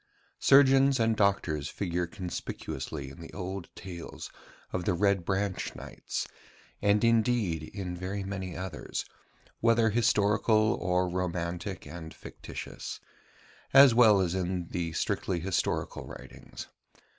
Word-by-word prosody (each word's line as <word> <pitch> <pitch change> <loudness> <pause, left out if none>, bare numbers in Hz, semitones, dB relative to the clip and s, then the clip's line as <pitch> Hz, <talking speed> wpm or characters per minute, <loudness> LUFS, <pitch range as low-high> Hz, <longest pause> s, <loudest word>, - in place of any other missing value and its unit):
Surgeons 135 -1 +6
and 115 0 +3
doctors 90 -8 +1
figure 90 -2 -2
conspicuously 80 -7 -5
in 70 - -12
the 80 - -9
old 95 -1 -5
tales 85 -2 -8 0.4
of 90 - -1
the 95 - +2
Red 100 0 +2
Branch 95 +1 -2
Knights, - - -5 0.5
and 105 +1 +3
indeed 115 -7 +2
in 95 -3 -5
very 95 +3 -4
many 95 -2 -5
others, 95 0 -4 0.5
whether 115 -1 +4
historical 110 -1 +3
or 90 0 +1
romantic 90 +1 -3
and 80 +1 -8
fictitious: - - -8 0.8
as 135 -2 +9
well 110 -4 +6
as 90 -2 0
in 90 -2 -2
the 85 -2 -2
strictly 90 +3 -1
historical 90 +1 -2
writings. - - -10
95 Hz, 120 wpm, -29 LUFS, 85-110 Hz, 0.8 s, as